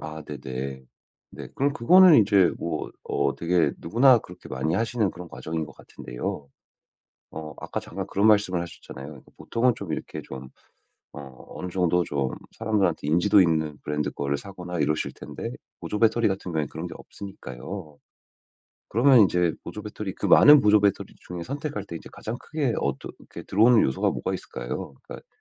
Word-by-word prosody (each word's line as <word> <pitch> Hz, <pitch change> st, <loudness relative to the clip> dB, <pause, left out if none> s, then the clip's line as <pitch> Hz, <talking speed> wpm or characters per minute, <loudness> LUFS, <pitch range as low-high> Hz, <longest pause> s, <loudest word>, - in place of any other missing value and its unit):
아 80 Hz, 0 st, -7 dB
네, 75 Hz, -1 st, -7 dB
네. 65 Hz, 0 st, -6 dB, 0.5 s
네. -, -, -9 dB
그럼 140 Hz, +1 st, +1 dB
그거는 180 Hz, +7 st, +7 dB
이제 100 Hz, -3 st, +4 dB
뭐 85 Hz, -2 st, -3 dB
어 -, -, 0 dB
되게 85 Hz, +1 st, +1 dB
누구나 120 Hz, +7 st, +5 dB
그렇게 90 Hz, -4 st, -13 dB
많이 80 Hz, +6 st, -1 dB
하시는 115 Hz, -1 st, 0 dB
그런 90 Hz, 0 st, -10 dB
과정인 80 Hz, 0 st, -4 dB
것 -, -, -13 dB
같은데요 70 Hz, +3 st, -7 dB, 0.8 s
어 75 Hz, -1 st, -8 dB
아까 -, -, -4 dB
잠깐 -, -, -6 dB
그런 100 Hz, +2 st, 0 dB
말씀을 100 Hz, -4 st, +3 dB
하셨잖아요. 75 Hz, -4 st, -9 dB, 0.2 s
보통은 120 Hz, +1 st, +1 dB
좀 95 Hz, -5 st, -5 dB
이렇게 -, -, -5 dB
좀 65 Hz, -1 st, -9 dB, 0.7 s
어 65 Hz, -3 st, -10 dB
어느 90 Hz, -, -5 dB
정도 90 Hz, -1 st, +2 dB
좀 70 Hz, -5 st, -2 dB, 0.3 s
사람들한테 95 Hz, -9 st, 0 dB
인지도 90 Hz, +6 st, +4 dB
있는 80 Hz, -4 st, +1 dB
브랜드 75 Hz, 0 st, -1 dB
거를 70 Hz, 0 st, -2 dB
사거나 90 Hz, -1 st, -6 dB
이러실 75 Hz, +2 st, 0 dB
텐데 -, -, -7 dB, 0.3 s
보조 105 Hz, -, -4 dB
배터리 115 Hz, 0 st, +3 dB
같은 95 Hz, -2 st, -2 dB
경우에는 80 Hz, -3 st, -1 dB
그런 80 Hz, +3 st, -6 dB
게 80 Hz, -, -9 dB
없으니까요. 80 Hz, -3 st, -9 dB, 0.9 s
그러면 125 Hz, +3 st, +5 dB
인제 90 Hz, -4 st, +4 dB
보조 105 Hz, -, -7 dB
배터리 105 Hz, -2 st, -6 dB
그 -, -, -4 dB
많은 145 Hz, -2 st, +8 dB
보조 105 Hz, 0 st, +5 dB
배터리 100 Hz, -1 st, 0 dB
중에 90 Hz, -1 st, -5 dB
선택할 140 Hz, -, -4 dB
때 85 Hz, -4 st, -7 dB
이제 -, -, -13 dB
가장 115 Hz, +3 st, -5 dB
크게 145 Hz, -7 st, -2 dB
어떤 70 Hz, -1 st, -3 dB
그렇게 -, -, -11 dB
들어오는 115 Hz, +3 st, +5 dB
요소가 65 Hz, -, +1 dB
뭐가 -, -, -3 dB
있을까요? -, -, -6 dB
그러니까 -, -, -11 dB
90 Hz, 375 characters per minute, -25 LUFS, 75-105 Hz, 0.9 s, 많은